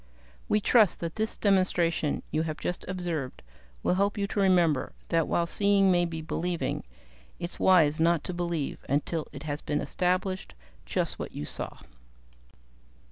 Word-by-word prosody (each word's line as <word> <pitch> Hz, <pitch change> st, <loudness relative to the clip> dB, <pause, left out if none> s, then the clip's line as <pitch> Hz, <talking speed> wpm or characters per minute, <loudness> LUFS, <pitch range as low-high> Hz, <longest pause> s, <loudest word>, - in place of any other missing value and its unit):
"We 210 Hz, -, +4 dB
trust 215 Hz, -2 st, +4 dB
that 165 Hz, -1 st, -4 dB
this 220 Hz, +1 st, -1 dB
demonstration 180 Hz, -6 st, +1 dB
you 155 Hz, -, +1 dB
have 155 Hz, -1 st, -3 dB
just 180 Hz, -, -3 dB
observed 175 Hz, -7 st, -4 dB, 0.4 s
will -, -, +2 dB
help 200 Hz, +3 st, +1 dB
you 200 Hz, -, 0 dB
to 205 Hz, -, -2 dB
remember 175 Hz, -8 st, +3 dB, 0.2 s
that 165 Hz, -1 st, +2 dB
while 170 Hz, -, +1 dB
seeing 200 Hz, +2 st, +3 dB
may 175 Hz, -1 st, +3 dB
be 160 Hz, -2 st, -5 dB
believing, 170 Hz, +2 st, -2 dB, 0.5 s
it's 170 Hz, -, -5 dB
wise 160 Hz, -5 st, +5 dB
not 165 Hz, -1 st, +3 dB
to 180 Hz, -, -4 dB
believe 170 Hz, -4 st, -3 dB
until 150 Hz, +3 st, 0 dB
it 140 Hz, 0 st, -9 dB
has 150 Hz, -1 st, -3 dB
been 150 Hz, 0 st, -1 dB
established 185 Hz, -, -1 dB, 0.3 s
just -, -, -1 dB
what -, -, -5 dB
you 75 Hz, -, -5 dB
saw." -, -, -5 dB
170 Hz, 155 wpm, -28 LUFS, 155-185 Hz, 0.5 s, wise